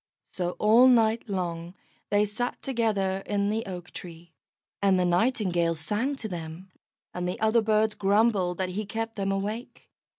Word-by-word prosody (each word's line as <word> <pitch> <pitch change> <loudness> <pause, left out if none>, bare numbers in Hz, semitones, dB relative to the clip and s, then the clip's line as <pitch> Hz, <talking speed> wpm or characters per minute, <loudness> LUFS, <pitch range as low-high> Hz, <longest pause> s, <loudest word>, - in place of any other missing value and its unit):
So 180 -1 -3
all 225 +4 +6
night 225 -2 +3
long 175 -2 -3 0.3
they 205 0 +3
sat 245 +4 -3
together 210 -7 0
in 205 0 0
the 225 +1 -1
oak 180 -2 -7
tree, 170 -1 -11 0.5
and 195 -2 +4
the 180 - +2
Nightingale 175 -3 +1
sang 210 - -1
to 230 -5 -5
them, 175 0 -7 0.4
and 180 0 -3
the 180 - -4
other 220 +1 +3
birds 215 0 +2
grumbled 200 -3 +2
that 185 -1 -1
he 200 +3 -4
kept 225 +2 -4
them 195 -1 -1
awake. 210 +5 -5
200 Hz, 160 wpm, -27 LUFS, 180-220 Hz, 0.5 s, all